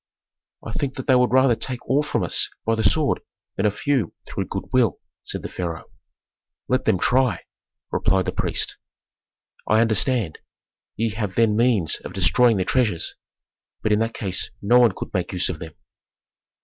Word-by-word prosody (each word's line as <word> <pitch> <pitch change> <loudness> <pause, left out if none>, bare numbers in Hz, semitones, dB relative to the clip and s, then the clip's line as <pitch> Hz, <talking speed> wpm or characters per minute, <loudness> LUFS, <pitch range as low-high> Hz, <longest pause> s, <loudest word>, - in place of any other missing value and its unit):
"I - - -5
think 135 +3 -3
that 130 - -6
they 135 - +4
would 125 -1 +4
rather 130 -1 +5
take 125 +2 -4
all 140 +3 +3
from 125 -9 -1
us 85 - +2 0.2
by 115 - +2
the 110 0 -1
sword 140 +8 +2 0.4
than 100 - +1
a - - +2
few 135 +3 -1
through - - -4
good - - -4
will," 125 -6 +2 0.2
said - - -5
the - - -3
pharaoh. 85 -3 -6 0.8
"Let - - 0
them - - +3
try!" 125 +3 +1 0.5
replied 95 -2 +1
the - - -1
priest. - - -1 0.9
"I 110 - +4
understand. 115 - +1 0.6
Ye 115 0 -1
have 105 -4 -4
then 115 -2 +3
means 115 -8 +2
of - - -10
destroying 100 +6 +4
the 95 - 0
treasures. 110 -10 0 0.7
But 110 - +1
in 105 - +3
that 115 0 -1
case 95 -3 -3
no 120 +5 +4
one 120 -2 +5
could - - -7
make 90 -2 -2
use 90 - +2
of 85 -4 -4
them." 80 -1 -8
110 Hz, 175 wpm, -23 LUFS, 95-125 Hz, 0.9 s, rather